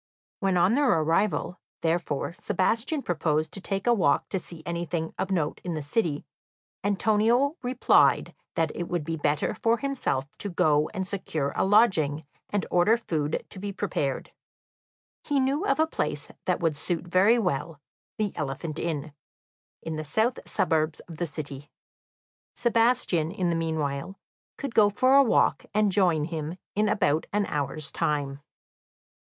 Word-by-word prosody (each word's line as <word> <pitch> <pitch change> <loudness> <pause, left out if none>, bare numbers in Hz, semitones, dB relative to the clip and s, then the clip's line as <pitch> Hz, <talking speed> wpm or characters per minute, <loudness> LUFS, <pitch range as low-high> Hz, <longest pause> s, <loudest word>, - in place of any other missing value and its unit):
When 190 -2 +1
on 180 +5 +4
their 280 +1 +3
arrival, 165 +3 +1 0.2
therefore, 165 -2 -1
Sebastian 230 - 0
proposed 155 -2 0
to 195 - -1
take 195 0 -3
a 240 - +5
walk 180 -10 +2
to 190 - -1
see 170 -2 -10
anything 170 -1 -3
of 190 - -1
note 165 -6 -1
in 175 -2 -3
the 155 - -4
city, 150 -1 -1 0.6
Antonio 220 +7 +2
replied 250 0 +3 0.2
that 160 -2 +1
it 175 - -4
would 175 -3 -2
be 165 +2 -3
better 150 -1 0
for 230 +1 +1
himself 235 - -2
to 205 - -2
go 155 -4 +2
and 190 -3 -3
secure 160 -7 -2
a - - +2
lodging, 185 -8 +3 0.2
and 205 -2 -1
order 195 +6 +4
food 155 -9 -2
to 190 - -9
be 200 +1 -4
prepared; 150 -9 -2 0.9
he 285 -2 +1
knew 280 +9 +1
of - - +2
a 315 - +5
place 150 - -3 0.2
that 180 -2 +1
would 165 -3 +1
suit 170 +4 -3
very 185 +7 +4
well, 165 - -2 0.4
the 210 -2 -1
Elephant 150 +3 -4
Inn, 155 -3 -3 0.7
in 160 -1 -4
the 155 - -3
south 220 - 0
suburbs 155 -1 +1
of 165 -3 -11
the 175 - -2
city. 145 -2 -7 0.9
Sebastian 230 -9 +2
in 180 -1 -1
the - - 0
meanwhile 160 +1 -2 0.4
could 275 -4 -5
go 210 -3 +6
for 255 +5 +3
a 280 - +8
walk, 255 - +2
and 210 -1 +3
join 175 -6 +2
him 160 0 -4 0.2
in 210 +1 +1
about 155 -6 +1
an 205 0 +1
hour's 145 -1 -3
time. 140 -2 -1
175 Hz, 160 wpm, -27 LUFS, 155-210 Hz, 0.9 s, a